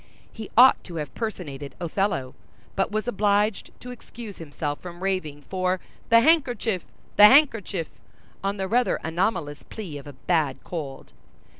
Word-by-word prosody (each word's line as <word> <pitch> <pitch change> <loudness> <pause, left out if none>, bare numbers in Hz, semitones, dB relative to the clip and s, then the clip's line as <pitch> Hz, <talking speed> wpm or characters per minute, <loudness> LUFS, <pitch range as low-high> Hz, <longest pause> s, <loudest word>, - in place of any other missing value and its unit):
He 220 -2 -8
ought 255 +2 +7
to 175 - -9
have 150 -2 -4
personated 150 - -5
Othello, 170 -7 -1 0.4
but 195 - +1
was 215 +2 -2
obliged 205 -1 +1
to 250 - -8
excuse 230 -3 -10
himself 145 -2 -4
from 175 0 -9
raving 155 -7 -2
for 185 +2 -1 0.3
"the 230 0 +7
handkerchief! 245 - +2 0.3
the 210 - +10
handkerchief!" 225 - +4 0.6
on 200 +1 -1
the 190 -1 -2
rather 245 +4 +2
anomalous 165 -3 -1
plea 175 -10 -7
of 140 - -13
a 145 - -9
bad 150 -1 -1
cold. 145 -6 -7
190 Hz, 145 wpm, -25 LUFS, 155-220 Hz, 0.6 s, the